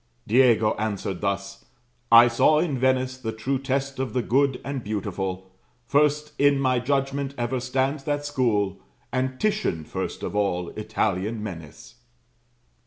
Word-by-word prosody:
"Diego 115 Hz, -2 st, +4 dB
answered 100 Hz, -4 st, -3 dB
thus: 100 Hz, 0 st, -3 dB, 0.5 s
'I 115 Hz, +1 st, +9 dB
saw 135 Hz, +6 st, +4 dB
in 155 Hz, -3 st, +1 dB
Venice 130 Hz, 0 st, +1 dB
The 110 Hz, -3 st, -3 dB
true 125 Hz, +5 st, -2 dB
test 135 Hz, 0 st, -2 dB
of 130 Hz, -1 st, -2 dB
the 125 Hz, -1 st, 0 dB
good 135 Hz, +2 st, +2 dB
and 140 Hz, -3 st, -4 dB
beautiful; 95 Hz, -3 st, -4 dB, 0.3 s
First 150 Hz, +2 st, +2 dB
in 140 Hz, 0 st, +4 dB
my 130 Hz, -2 st, +2 dB
judgment, 135 Hz, +1 st, -1 dB
ever 120 Hz, +2 st, -1 dB
stands 130 Hz, +3 st, -1 dB
that 145 Hz, -1 st, -1 dB
school, 110 Hz, -9 st, 0 dB, 0.3 s
And 130 Hz, 0 st, -2 dB
Titian 210 Hz, -, 0 dB
first -, -, -5 dB
of -, -, -4 dB
all 90 Hz, -4 st, 0 dB
Italian 105 Hz, 0 st, -2 dB
men 90 Hz, -6 st, -5 dB
is.'" 115 Hz, -, -15 dB
125 Hz, 145 wpm, -25 LUFS, 105-135 Hz, 0.5 s, I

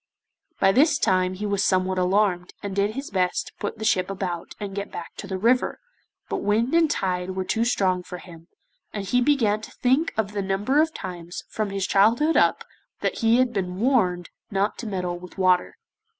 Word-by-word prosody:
By 195 Hz, -, +5 dB
this 285 Hz, +10 st, +4 dB
time 185 Hz, -1 st, +1 dB
he 205 Hz, +3 st, -4 dB
was 200 Hz, -1 st, 0 dB
somewhat 185 Hz, 0 st, +1 dB
alarmed, 185 Hz, -1 st, +1 dB
and 200 Hz, -1 st, -4 dB
did 200 Hz, +2 st, +1 dB
his 275 Hz, -3 st, -5 dB
best 180 Hz, -2 st, 0 dB
to -, -, -12 dB
put 205 Hz, -, -4 dB
the 220 Hz, -, -5 dB
ship 185 Hz, -4 st, +2 dB
about 185 Hz, -3 st, -4 dB
and 200 Hz, -2 st, -5 dB
get 200 Hz, +1 st, -5 dB
back 170 Hz, -, -7 dB
to -, -, -7 dB
the 190 Hz, -1 st, -3 dB
river, 235 Hz, +6 st, +2 dB, 0.5 s
but -, -, -2 dB
wind 225 Hz, +6 st, +1 dB
and 330 Hz, -2 st, +4 dB
tide 185 Hz, -7 st, -1 dB
were 190 Hz, -, -1 dB
too 225 Hz, +4 st, 0 dB
strong 190 Hz, -6 st, +1 dB
for 180 Hz, 0 st, -8 dB
him, 170 Hz, -2 st, -13 dB, 0.5 s
and 205 Hz, -2 st, -4 dB
he 250 Hz, +6 st, +2 dB
began 235 Hz, -6 st, +2 dB
to -, -, -9 dB
think 265 Hz, +6 st, +1 dB
of 210 Hz, -2 st, 0 dB
the 205 Hz, -1 st, -2 dB
number 205 Hz, +9 st, +1 dB
of 320 Hz, +1 st, +1 dB
times, 175 Hz, -, -7 dB
from 215 Hz, -2 st, -2 dB
his 195 Hz, -1 st, -2 dB
childhood 230 Hz, +13 st, +3 dB
up, -, -, +3 dB, 0.4 s
that -, -, -1 dB
he 230 Hz, 0 st, +4 dB
had 255 Hz, -1 st, +2 dB
been 185 Hz, -3 st, -3 dB
warned 190 Hz, -9 st, +1 dB, 0.2 s
not 200 Hz, +1 st, 0 dB
to 235 Hz, -, -5 dB
meddle 180 Hz, -3 st, -3 dB
with 180 Hz, +2 st, -12 dB
water. 185 Hz, -1 st, +2 dB
195 Hz, 205 wpm, -24 LUFS, 185-225 Hz, 0.5 s, By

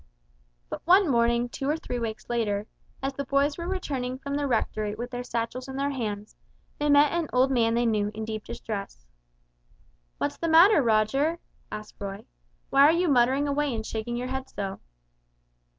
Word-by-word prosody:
But -, -, -6 dB
one 375 Hz, +2 st, +6 dB
morning 235 Hz, -2 st, +2 dB
two 270 Hz, +3 st, -4 dB
or 305 Hz, -, +1 dB
three 245 Hz, -6 st, -4 dB
weeks 220 Hz, -2 st, -5 dB
later, 210 Hz, -4 st, -1 dB, 0.4 s
as 270 Hz, 0 st, -1 dB
the 280 Hz, -, -3 dB
boys 280 Hz, +2 st, +1 dB
were 340 Hz, -, -4 dB
returning 270 Hz, -9 st, -3 dB
from 280 Hz, +1 st, -6 dB
the 285 Hz, 0 st, 0 dB
Rectory 215 Hz, -4 st, -1 dB
with 240 Hz, +3 st, -6 dB
their 245 Hz, 0 st, -4 dB
satchels 240 Hz, +2 st, -3 dB
in 265 Hz, -, -7 dB
their 280 Hz, +1 st, 0 dB
hands, 210 Hz, -5 st, -4 dB, 0.4 s
they 295 Hz, 0 st, +1 dB
met 285 Hz, 0 st, +6 dB
an 340 Hz, -2 st, -1 dB
old 255 Hz, +2 st, +3 dB
man 230 Hz, -3 st, +2 dB
they 240 Hz, +1 st, +2 dB
knew 210 Hz, -3 st, +1 dB
in 220 Hz, 0 st, -4 dB
deep 215 Hz, -1 st, -5 dB
distress. 200 Hz, -, -6 dB, 1.1 s
"What's -, -, -2 dB
the 335 Hz, -, -2 dB
matter, 335 Hz, +3 st, +7 dB
Roger?" 255 Hz, +8 st, +2 dB, 0.3 s
asked 215 Hz, 0 st, -8 dB
Roy; 200 Hz, 0 st, -6 dB, 0.5 s
"why 275 Hz, -, +5 dB
are 290 Hz, +2 st, +8 dB
you 345 Hz, +1 st, +1 dB
muttering 265 Hz, +2 st, +3 dB
away 285 Hz, -2 st, 0 dB
and 220 Hz, -1 st, -4 dB
shaking 225 Hz, +2 st, -3 dB
your 250 Hz, +1 st, -3 dB
head 265 Hz, 0 st, -4 dB
so?" 195 Hz, -1 st, -5 dB
250 Hz, 180 wpm, -27 LUFS, 220-285 Hz, 1.1 s, are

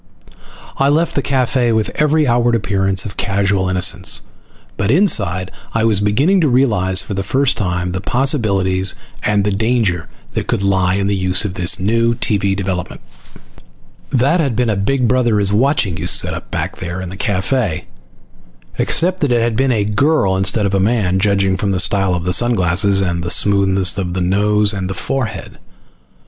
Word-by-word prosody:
I 135 Hz, +1 st, +2 dB
left 160 Hz, +4 st, +1 dB
the 140 Hz, -, -1 dB
cafe 130 Hz, -2 st, 0 dB
with 110 Hz, -1 st, -1 dB
every 150 Hz, 0 st, +1 dB
outward 120 Hz, -1 st, +1 dB
appearance 95 Hz, -2 st, 0 dB
of 100 Hz, -, -8 dB
casual 100 Hz, -1 st, 0 dB
innocence; 95 Hz, +1 st, +2 dB, 0.5 s
but 100 Hz, -, -2 dB
inside 100 Hz, -, +1 dB, 0.2 s
I 115 Hz, -, +1 dB
was 110 Hz, -3 st, +2 dB
beginning 135 Hz, -, +2 dB
to 155 Hz, -, +2 dB
realize 105 Hz, -8 st, +2 dB
for -, -, -6 dB
the 100 Hz, -, -2 dB
first 135 Hz, +7 st, 0 dB
time 90 Hz, -2 st, -2 dB
the 90 Hz, 0 st, -4 dB
possibilities 100 Hz, -8 st, 0 dB, 0.3 s
and 105 Hz, -1 st, 0 dB
the 105 Hz, -, 0 dB
danger 105 Hz, -5 st, -1 dB, 0.2 s
that -, -, -3 dB
could 100 Hz, -, -1 dB
lie 95 Hz, -2 st, +1 dB
in 100 Hz, 0 st, -1 dB
the 100 Hz, 0 st, 0 dB
use 95 Hz, +1 st, 0 dB
of 100 Hz, -, -4 dB
this 90 Hz, -1 st, +3 dB
new 115 Hz, +4 st, +1 dB
TV 100 Hz, -3 st, 0 dB
development. 95 Hz, -3 st, -4 dB, 1.1 s
That 140 Hz, +7 st, +1 dB
had 140 Hz, -8 st, -1 dB
been 120 Hz, -1 st, 0 dB
a -, -, -1 dB
Big 120 Hz, +6 st, 0 dB
Brother 120 Hz, -3 st, +1 dB
is 100 Hz, 0 st, +1 dB
Watching 110 Hz, -, +1 dB
you -, -, -4 dB
setup -, -, 0 dB
back -, -, -4 dB
there 85 Hz, +2 st, -6 dB
in 95 Hz, -1 st, -6 dB
the -, -, -7 dB
cafe, 100 Hz, -, -2 dB, 0.9 s
except 185 Hz, +2 st, +1 dB
that 145 Hz, -6 st, 0 dB
it 120 Hz, -1 st, +2 dB
had 115 Hz, -1 st, -1 dB
been 135 Hz, +2 st, +1 dB
a 105 Hz, -4 st, 0 dB
girl 105 Hz, -2 st, +1 dB
instead 95 Hz, +3 st, 0 dB
of 100 Hz, -, -1 dB
a 100 Hz, -, +1 dB
man, 95 Hz, -3 st, 0 dB
judging 100 Hz, -1 st, +1 dB
from 100 Hz, -, -2 dB
the 95 Hz, -, -1 dB
style 95 Hz, -1 st, +2 dB
of 85 Hz, -1 st, -4 dB
sun 120 Hz, +6 st, +2 dB
glasses 95 Hz, +2 st, +1 dB
and 90 Hz, -2 st, -2 dB
the 85 Hz, -, -3 dB
smoothness 95 Hz, +2 st, +2 dB
of 90 Hz, -2 st, -4 dB
the 95 Hz, -, -2 dB
nose 105 Hz, +3 st, +1 dB
and 95 Hz, -2 st, -4 dB
forehead. 130 Hz, +3 st, -3 dB
100 Hz, 180 wpm, -16 LUFS, 95-120 Hz, 1.1 s, this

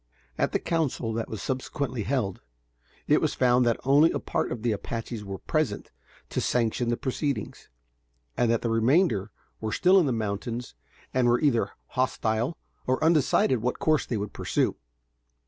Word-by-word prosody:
At -, -, 0 dB
the -, -, +2 dB
council 150 Hz, -9 st, -1 dB
that 115 Hz, 0 st, -3 dB
was 110 Hz, -, -5 dB
subsequently 130 Hz, -1 st, -3 dB
held, 110 Hz, -4 st, -1 dB, 0.7 s
it -, -, +4 dB
was -, -, 0 dB
found 125 Hz, -1 st, +3 dB
that 115 Hz, -, +1 dB
only 145 Hz, +4 st, +6 dB
a -, -, -1 dB
part -, -, -2 dB
of 115 Hz, -3 st, -4 dB
the 120 Hz, -, +2 dB
Apaches 115 Hz, +1 st, -4 dB
were 100 Hz, -1 st, -5 dB
present -, -, -2 dB, 0.4 s
to -, -, -1 dB
sanction 120 Hz, 0 st, 0 dB
the 120 Hz, -, +1 dB
proceedings, 140 Hz, +1 st, -3 dB, 0.7 s
and 120 Hz, -, +2 dB
that 115 Hz, -1 st, +1 dB
the 115 Hz, -, 0 dB
remainder 115 Hz, -, +2 dB, 0.3 s
were 110 Hz, -1 st, -3 dB
still 185 Hz, -, +5 dB
in 170 Hz, -, +2 dB
the -, -, +1 dB
mountains 115 Hz, +2 st, -3 dB, 0.4 s
and 130 Hz, -1 st, +3 dB
were 120 Hz, 0 st, +4 dB
either 135 Hz, -6 st, +1 dB, 0.2 s
hostile 120 Hz, +2 st, 0 dB, 0.3 s
or 130 Hz, +3 st, +1 dB
undecided 150 Hz, -6 st, +3 dB
what 125 Hz, +2 st, -1 dB
course 155 Hz, -1 st, +1 dB
they 115 Hz, -, -1 dB
would 100 Hz, 0 st, -4 dB
pursue. -, -, 0 dB
120 Hz, 165 wpm, -27 LUFS, 115-135 Hz, 0.7 s, only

